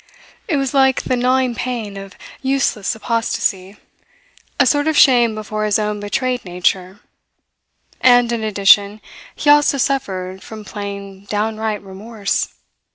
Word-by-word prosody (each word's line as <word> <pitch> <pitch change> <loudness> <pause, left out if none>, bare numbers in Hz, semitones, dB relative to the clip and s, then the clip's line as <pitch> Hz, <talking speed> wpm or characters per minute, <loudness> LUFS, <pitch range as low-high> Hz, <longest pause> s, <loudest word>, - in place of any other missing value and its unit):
It 325 -8 0
was 270 -1 -1
like 265 -1 +3
the 255 - 0
gnawing 255 0 +1
pain 230 -5 -4
of 195 -1 -9 0.3
useless 265 -7 0
apostasy, 210 -3 -2 0.8
a - - +5
sort 290 0 +2
of 315 -2 +1
shame 240 -4 +5
before 215 0 -4
his 210 -1 +2
own 210 -1 -2
betrayed 250 +5 -2
nature; 180 +2 -2 1.0
and 245 -2 +5
in 230 -2 -2
addition, 205 0 +3 0.4
he 295 - +3
also 295 -1 +4
suffered 190 -9 -2
from 215 -1 -10
plain, 200 -1 -7
downright 215 0 -2
remorse. 200 +2 -3
215 Hz, 130 wpm, -18 LUFS, 200-255 Hz, 1.0 s, a